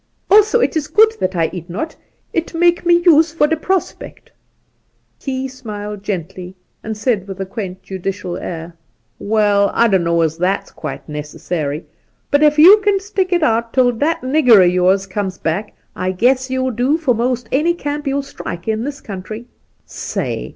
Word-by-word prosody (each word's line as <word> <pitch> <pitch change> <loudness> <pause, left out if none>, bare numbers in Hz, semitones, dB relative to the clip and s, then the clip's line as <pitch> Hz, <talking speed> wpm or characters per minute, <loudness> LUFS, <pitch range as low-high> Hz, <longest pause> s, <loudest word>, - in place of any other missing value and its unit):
Also 430 +3 +6
it - - +1
is 305 -2 -1
good 430 +8 +5
that 185 0 -1
I 165 -2 0
eat 175 -1 -7
not. 270 - -4 0.4
It 335 0 -2
make 345 +1 +2
me 345 0 +4
use 325 -2 +5
for 325 -2 +2
the 320 +2 +1
prospect' 375 +3 -4 0.9
Key 265 -1 -3
smUed 210 -5 -7
gently, 185 -1 -5 0.3
and 220 -1 -5
said, 210 -3 -1
with 195 -1 -8
a 195 - -2
quaint 190 -2 -7
judicial 190 -1 -5
air: 165 0 -6 0.3
' - - -46
Waal, 205 -1 +2
I 235 - +4
don't 190 -5 +2
know 170 0 +2
as 160 0 -1
that's 185 +3 -1
quite - - -7
necessary; 150 0 -4 0.5
but 285 - +3
ef 300 0 +4
you 380 +8 +8
kin 400 -1 +2
stick 385 -2 -2
it 345 -2 +2
out 230 -3 +1
tiU 255 -2 +4
that 325 +3 0
nigger 255 -6 +5
o' - - +6
yours 180 +2 +2
comes 190 -1 -4
back, 185 +6 -3 0.2
I 185 0 -2
guess 255 +6 +2
you'll 260 0 -1
do 250 +6 +1
for 300 -7 +1
most 240 +1 -1
any 325 +6 +2
camp 295 -2 -4
you'll 275 +1 0
strike 175 -9 -8
in 220 0 -1
this 285 +2 -5
country. 215 +3 -7 0.4
Say - - -4
230 Hz, 180 wpm, -18 LUFS, 190-300 Hz, 0.9 s, you